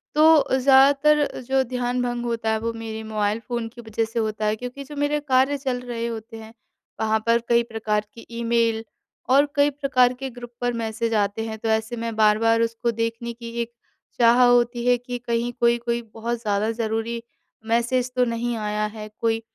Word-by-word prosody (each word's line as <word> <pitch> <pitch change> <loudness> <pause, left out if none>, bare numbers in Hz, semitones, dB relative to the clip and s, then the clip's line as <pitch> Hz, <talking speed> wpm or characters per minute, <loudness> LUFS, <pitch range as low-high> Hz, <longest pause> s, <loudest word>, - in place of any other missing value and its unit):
तो 305 -3 +5
ज़्यादातर 280 +3 +4
जो 265 0 +3
ध्यान 250 0 -2
भँग 240 -1 -2
होता 230 -2 -1
है 220 - 0
वो 230 +1 -2
मेरे 220 -1 -6
मोबाइल 215 0 -1
फ़ोन 235 0 -4
की 240 +1 -12
वजह 225 0 -2
से 225 +1 -3
होता 215 -1 -2
है 210 0 +1
क्योंकि 250 +4 -7
जो 295 +2 -10
मेरे 290 +1 0
कार्य 270 0 +2
चल 260 -3 -2
रहे 235 -2 -4
होते 225 0 -7
हैं 220 0 -11 0.5
वहाँ 220 0 +2
पर 230 0 +4
कई 235 0 +4
प्रकार 220 -2 -2
की 230 - -12
ईमेल 230 -1 +1 0.5
और 275 +3 +6
कई 285 0 +4
प्रकार 270 -3 +2
के 270 0 -4
ग्रुप 240 -1 -10
पर 245 0 0
मैसेज 230 0 -2
आते 210 +1 0
हैं, 220 -1 -5
तो 225 +1 -3
ऐसे 220 +2 0
मैं 230 -1 -4
बार-बार 220 +1 +3
उसको 230 +1 0
देखने 230 +1 -3
की 235 0 -9
एक 235 0 -4 0.5
चाह 240 +1 +6
होती 240 0 +3
है 245 - +5
कि 245 0 -6
कहीं 235 0 -1
कोई-कोई 235 0 +1
बहुत 235 +1 -3
ज़्यादा 210 0 0
ज़रूरी 225 +1 -2 0.5
मैसेज 240 +2 +1
तो 250 0 +3
नहीं 235 0 -2
आया 210 0 -1
है, 210 0 -7
कोई 225 -1 0
235 Hz, 190 wpm, -23 LUFS, 225-245 Hz, 0.5 s, और